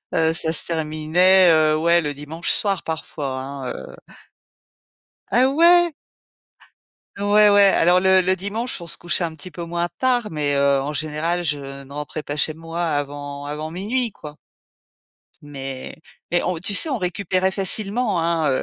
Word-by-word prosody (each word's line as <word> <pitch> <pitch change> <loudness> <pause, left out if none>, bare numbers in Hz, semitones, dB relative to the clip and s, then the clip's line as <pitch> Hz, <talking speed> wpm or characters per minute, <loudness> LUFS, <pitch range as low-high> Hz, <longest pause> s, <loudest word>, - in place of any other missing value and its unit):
heu, 160 0 +2
ça 165 -1 0
se - - -1
terminait, 165 +3 +3
heu, 155 -1 +3
ouais, 170 +2 +3
le 145 -2 -4
dimanche 150 +4 -4
soir 195 -4 +2
parfois 145 -4 -5
hein, 135 -1 -7
heu 65 - -10 1.4
Ah 250 +2 +4
ouais? 340 +3 +4 1.2
Ouais, 205 +1 +4
ouais 205 0 +6
alors 180 -2 +4
le 190 0 +4
le 185 +1 +2
dimanche, 205 +5 -4
on 170 - -8
se - - -3
couchait 175 +1 -1
un 165 -2 -3
petit 165 +4 -9
peu 175 - -7
moins 170 +1 -2
tard, 245 -4 +1
mais, 145 -2 0
heu, 140 0 +3
en 145 +3 -4
général, 155 +4 -2
je 140 -2 -4
ne 140 - -15
rentrais 150 +1 -6
pas 145 - -4
chez 150 +1 0
moi 165 +2 -6
avant 145 -2 -4
avant 150 +2 -5
00:00 225 +8 -1
quoi. 150 -6 -11 1.1
Mais 135 -2 -7 0.3
mais 175 +1 +1
on 180 -2 -1
tu 180 +4 -2
sais, 315 - +3
on 265 -5 -1
récupérait 185 0 -1
facilement, 200 +1 0
hein. 165 -2 +1
Heu, 130 - 0
165 Hz, 170 wpm, -21 LUFS, 150-190 Hz, 1.4 s, ouais